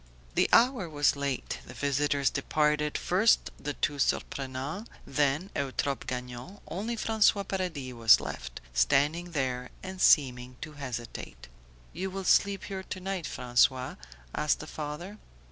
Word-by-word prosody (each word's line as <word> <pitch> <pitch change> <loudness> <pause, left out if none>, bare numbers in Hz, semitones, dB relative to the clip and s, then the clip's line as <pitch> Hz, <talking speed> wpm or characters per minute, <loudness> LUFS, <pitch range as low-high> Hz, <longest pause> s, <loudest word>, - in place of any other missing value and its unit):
The - - +3
hour 235 -7 +4
was 145 -2 +2
late; 140 -2 -3
the - - -10
visitors 140 0 +1
departed; 150 +1 +1
first 200 +6 +3
the 145 - -3
two 145 0 -1
Surprenants, 135 - -2 0.2
then 145 +7 0
Eutrope 140 0 -2
Gagnon, 125 +8 -6
only 220 +6 -3
François 215 -2 +3
Paradis 170 -9 -3
was 115 -2 +6
left, - - -6
standing 150 - +2
there 130 -3 -1
and 190 0 -6
seeming 125 -3 +4
to 155 - -6
hesitate. 120 - -7 0.5
"You 190 +1 -3
will 195 +1 -5
sleep 200 +1 +3
here 195 -1 -5
to 190 0 -6
night, 190 -2 -3
François?" 125 +1 +1 0.4
asked 150 - +1
the - - -7
father. 155 +7 -6
145 Hz, 135 wpm, -29 LUFS, 130-185 Hz, 0.5 s, was